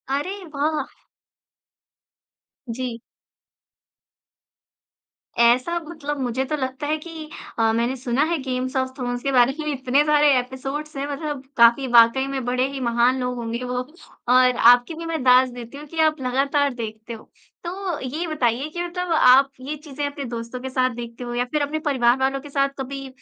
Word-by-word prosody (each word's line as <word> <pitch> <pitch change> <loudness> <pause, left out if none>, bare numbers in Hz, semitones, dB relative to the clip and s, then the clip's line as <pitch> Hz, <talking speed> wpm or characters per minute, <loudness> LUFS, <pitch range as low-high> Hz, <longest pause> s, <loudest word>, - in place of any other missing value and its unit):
अरे 295 +7 -2 0.2
वाह! 305 +2 -3 1.6
जी। 235 0 -4 2.4
ऐसा 250 +8 +4
मतलब 295 -3 -5
मुझे 255 0 -1
तो 305 - -2
लगता 265 +2 -4
है 305 +1 0
कि 315 -1 -9 0.3
अ, 225 0 +3
मैंने 235 +3 0
सुना 255 +2 0
है 340 - +1
गेम्स 255 0 -3
ऑफ़ 260 0 0
थ्रोन्स 245 -2 -4
के 275 - 0
बारे 250 0 +4
में 305 -1 -2
इतने 265 +1 +2
सारे 295 -1 +4
एपिसोड्स 270 +4 -6
हैं, 275 +1 -2
मतलब 285 -1 -4
काफ़ी 235 +3 +5
वाक़ई 235 +3 +6
में 270 -1 -3
बड़े 250 +1 +1
ही 275 - -5
महान 240 +2 +2
लोग 250 0 -2
होंगे 235 +1 -4
वो, 250 0 -2 0.4
और 250 0 +5
आपकी 245 +5 +5
भी 330 +1 -7
मैं 325 -2 -3
दात 255 0 +6
देती 245 +2 -9
हूँ 295 - -9
कि 325 +2 -7
आप 310 -3 -2
लगातार 275 +2 +1
देखते 225 -1 -7
हो। 220 - -12 0.3
तो 365 -1 -4
ये 300 +7 -4
बताइए 265 -3 0
कि 345 +3 -5
मतलब 355 0 -4
आप 270 -2 +6
ये 290 +4 -4
चीज़ें 290 -1 -5
अपने 285 -1 -5
दोस्तों 235 +1 -6
के 265 - -5
साथ 255 0 +1
देखते 235 0 -7
हो 240 - -5
या 245 - 0
फिर 300 -1 0
अपने 295 +2 -1
परिवार 245 -3 +3
वालों 270 +1 0
के 290 - -11
साथ 275 0 +1
कभी 275 +1 -5
265 Hz, 175 wpm, -22 LUFS, 245-295 Hz, 2.4 s, वाक़ई